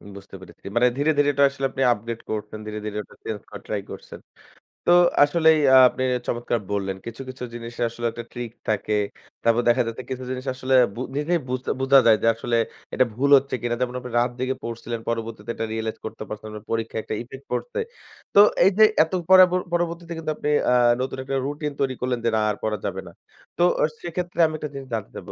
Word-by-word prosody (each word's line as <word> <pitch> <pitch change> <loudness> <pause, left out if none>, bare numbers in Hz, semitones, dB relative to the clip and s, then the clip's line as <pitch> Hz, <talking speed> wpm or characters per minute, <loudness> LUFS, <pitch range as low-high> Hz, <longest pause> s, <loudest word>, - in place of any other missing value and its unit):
বুঝতে 100 0 -11
পেরেছি। 95 - -15
মানে 120 +1 +5
ধীরে, 145 +3 +2
ধীরে 145 0 +4
এটা 140 +1 +3
আসলে 135 0 -4
আপনি 135 - -4
আপগ্রেড 115 +1 -6
করছেন। 105 0 -4
ধীরে, 105 0 -5
ধীরে 105 0 -4
ওটা - - -19
চেঞ্জ 110 -2 -4
করার - - -9
ট্রাই 105 -2 -2
করছেন। - - -10 0.7
তো 175 - +7 0.3
আসলেই 160 +1 +4 0.3
আপনি 130 - -4 0.2
চমৎকার 120 0 -1
বললেন। 100 -1 -1
কিছু, 115 +2 -7
কিছু 130 -1 -8
জিনিসের 120 0 -4
আসলে 120 +1 -6
একটা 120 +1 -7
ট্রিক 120 -2 -5 0.2
থাকে। 105 0 0 0.5
তারপর 115 +1 +3
দেখা 125 +2 +4
যাচ্ছে 115 +2 -5
কিছু 130 0 -4
জিনিস 130 +1 -5
আসলে 130 0 0 0.2
বু 120 - -5 0.2
নিজেই 170 +4 +1
বুঝ 130 0 -2 0.2
বুঝা 135 +1 +6
যায় 110 -1 +6
যে, 115 - +3
আসলে 115 +1 -2 0.4
এটা 130 - +3
ভুল 140 +4 +1
হচ্ছে 135 0 -2
কিনা। 120 0 -1
যেমন 125 0 -1
আপনি 125 -1 -8
রাত 120 +1 +1
জেগে 130 +1 -1
পড়ছিলেন 115 0 -5
পরবর্তীতে 115 -1 -4
এটা 115 - -2
রিয়ালাইজ 110 0 -3
করতে 110 0 -6
পারছেন, 110 0 -7
আপনার 105 0 -9
পরীক্ষায় 115 0 -2
একটা - - -4
ইফেক্ট 135 +3 -11
পড়ছে। 125 - -3 0.6
তো - - +8 0.3
এইযে 195 +3 +5 0.2
এত 160 +3 -8 0.2
পরাব 185 -1 +8 0.2
পরবর্তীতে 170 0 -2
কিন্তু 160 -1 -3
আপনি 150 - -3 0.2
আ - - +5 0.3
নতুন 130 - -3
একটা 135 +1 -3
রুটিন 145 +1 -3
তৈরি 135 -1 +1
করলেন 125 -1 -1
যে, - - +4
না - - +2
আর - - -4
পড়া 110 -1 -1
যাবে 95 0 -3
না। - - -10 0.5
তো 175 - +3 0.2
আ - - +6 0.2
সেক্ষেত্রে 175 0 -5
আমি 155 - -6
একটা 150 -1 -5
জিনিস 135 -1 -8
জানতে 110 -3 -3
চাবো। - - -8
125 Hz, 210 wpm, -24 LUFS, 115-140 Hz, 0.7 s, তো